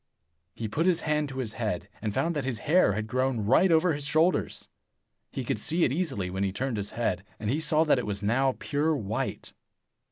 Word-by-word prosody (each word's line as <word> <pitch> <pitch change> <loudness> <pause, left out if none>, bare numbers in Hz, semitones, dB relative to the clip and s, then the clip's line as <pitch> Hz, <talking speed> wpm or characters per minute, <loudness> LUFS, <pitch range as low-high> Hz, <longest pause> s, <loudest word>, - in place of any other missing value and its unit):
He 115 - -4
put 160 - 0
his 180 -3 +3
hand 150 -1 0
to 135 - -7
his 120 -5 -3
head, 105 -7 -3
and 110 -1 -1
found 165 +10 0
that 145 - -1
his 130 -3 -2
hair 155 - +4
had 105 +2 -2
grown 130 +1 0
right 150 - +4
over 165 +1 +4
his 145 -1 -2
shoulders. 160 +4 +1 0.6
He - - -4
could - - -2
see 170 +2 0
it - - +3
easily 135 - -1
when 95 +1 -2
he 95 - 0
turned 125 +3 -2
his 100 0 -4
head, 95 -6 0 0.2
and 105 +1 -1
he 145 - 0
saw 155 0 +2
that 150 -5 +3
it 120 - -4
was 100 -1 -3
now 130 +5 +2
pure 150 +2 0
white. 110 -5 -3
130 Hz, 220 wpm, -28 LUFS, 105-155 Hz, 0.6 s, hair